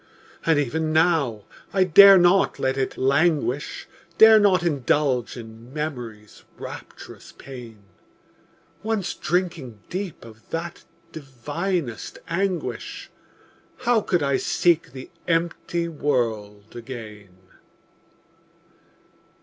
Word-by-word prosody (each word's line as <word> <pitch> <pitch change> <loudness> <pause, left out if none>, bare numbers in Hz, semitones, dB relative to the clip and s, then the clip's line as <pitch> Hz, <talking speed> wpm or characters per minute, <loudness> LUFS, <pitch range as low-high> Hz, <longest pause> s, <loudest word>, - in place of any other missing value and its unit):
And 165 -2 +4
even 155 +3 -1
now, 155 - +2 0.3
I 190 - +4
dare 195 +2 +9
not 180 +2 +3
let 130 0 0
it 135 -1 -2
languish, 140 0 0 0.3
Dare 220 0 +8
not 190 -4 +3
indulge 140 -5 0
in 115 +1 -11
Memory's 120 -8 -6
rapturous - - -10
pain; 120 -6 -11 1.0
Once 220 -4 -2
drinking 165 - -2
deep 185 -6 -5
of 110 -1 -16
that 165 +1 -5 0.3
divinest 145 - -4
anguish, 185 +1 -3 0.7
How 240 -3 +2
could 175 -6 0
I 140 -1 +1
seek 170 0 +1
the 130 0 -10 0.2
empty 170 0 -1
world 110 -9 -2
again? 110 -6 -9
150 Hz, 95 wpm, -23 LUFS, 120-175 Hz, 1.0 s, dare